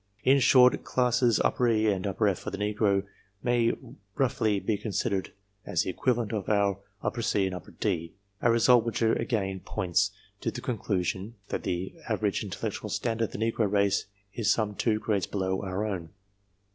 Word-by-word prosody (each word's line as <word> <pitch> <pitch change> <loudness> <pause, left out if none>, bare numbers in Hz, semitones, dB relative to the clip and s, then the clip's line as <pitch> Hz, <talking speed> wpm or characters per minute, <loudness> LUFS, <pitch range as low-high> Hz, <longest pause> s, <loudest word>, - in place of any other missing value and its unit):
In 135 +2 +5
short, 125 -1 +6
classes 125 -2 +2
E 115 -3 +2
and 95 0 -2
F 95 - -4
of 100 -4 +1
the 100 - -4
negro 105 -1 +1 0.4
may 120 -1 +3 0.4
roughly 110 -6 +1
be 100 +3 0
considered 100 -2 -2 0.3
as 85 - 0
the - - -2
equivalent 120 +1 0
of 105 -4 -2
our 100 -2 +2 0.4
C 105 -3 +1
and 90 -1 -6
D 85 -6 -1 0.3
a 120 - +3
result 115 +1 +5
i - - -13
which 115 - -2
again 100 -4 0
points 95 +2 0 0.3
to - - -1
the - - -6
conclusion, 100 -2 -2
that - - -2
the 90 +1 -3 0.2
average - - 0
j - - -4
intellectual - - -4
standard 115 0 0
of - - -9
the - - -4
negro 110 -3 0
race 100 -1 +2 0.3
is 110 -3 0
some 105 -2 +1
two 110 +1 +1
grades/ 105 -3 -1
below 95 -1 -1
our 95 +2 -2
own. 90 -6 -4
105 Hz, 170 wpm, -28 LUFS, 95-115 Hz, 0.4 s, short